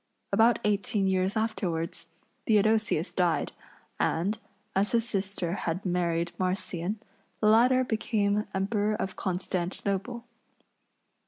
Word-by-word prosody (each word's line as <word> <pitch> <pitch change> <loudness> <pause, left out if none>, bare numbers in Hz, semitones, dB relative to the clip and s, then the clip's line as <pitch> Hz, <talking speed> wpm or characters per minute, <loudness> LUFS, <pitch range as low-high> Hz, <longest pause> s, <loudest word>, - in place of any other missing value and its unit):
About 225 0 +5
eighteen 205 -1 +1
years 190 +2 +1
afterwards 170 -7 -2 0.4
Theodosius 215 -5 +2
died, 175 -3 +1 0.5
and, 195 +7 +1 0.4
as 200 +4 +1
his 230 0 +2
sister 195 -5 -1
had 180 -1 -3
married 170 -1 0
Marcian, 185 +1 -1 0.4
the - - 0
latter 245 +4 +5
became 210 -3 0
Emperor 205 +2 0
of 190 -2 -3
Constantinople. 195 +5 -2
200 Hz, 100 wpm, -28 LUFS, 180-220 Hz, 0.5 s, About